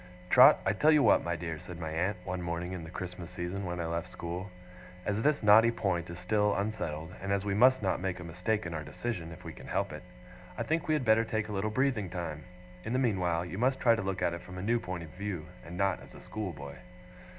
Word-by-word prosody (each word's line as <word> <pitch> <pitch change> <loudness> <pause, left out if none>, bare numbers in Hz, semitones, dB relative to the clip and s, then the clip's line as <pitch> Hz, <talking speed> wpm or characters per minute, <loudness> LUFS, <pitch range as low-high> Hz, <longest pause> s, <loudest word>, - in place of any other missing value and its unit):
'Trot, - - +9
I 95 - +3
tell 150 +9 +3
you 150 -2 +5
what, - - +5
my 85 0 -1
dear,' 80 -2 -4
said 90 +1 -9
my 80 -2 -4
aunt, 90 +6 0
one 90 -1 -3
morning 85 +1 -3
in 90 -3 -5
the 80 - -8
Christmas 90 0 -6
season 90 +2 -4
when 90 0 -3
I 85 - -1
left 85 0 -2
school: 90 +3 -5 0.6
'as 105 +1 0
this 145 -1 +2
knotty 110 +3 +7
point 95 -7 -1
is 85 - -6
still 105 +2 +1
unsettled, 85 -6 -3
and 100 +1 -3
as 100 0 +1
we 100 - 0
must 125 +3 +5
not 95 -2 0
make 95 -1 -2
a - - -7
mistake 90 +6 -1
in 85 - -4
our 80 -1 -3
decision 85 - -4
if 80 - -11
we - - -7
can - - -12
help - - -1
it, - - -7 0.6
I - - -1
think 160 +1 -1
we 155 - +3
had 145 -4 -1
better 110 0 +5
take 110 -1 -2
a - - -4
little 100 +2 0
breathing 120 -5 +1
time. 80 -4 -5 0.4
In 110 - -3
the - - +2
meanwhile, 90 -9 +1
you 90 +3 -6
must 130 +2 +2
try 120 -3 +5
to 110 - 0
look 95 -1 -2
at 85 - +2
it 85 - -5
from 90 - -10
a 90 - -4
new 120 +3 +2
point 90 -4 -5
of 80 - -9
view, 90 -4 -4 0.2
and 85 +1 -8
not 100 -2 +1
as - - -14
a - - -11
schoolboy. 75 -10 -6
95 Hz, 255 wpm, -31 LUFS, 85-110 Hz, 0.6 s, Trot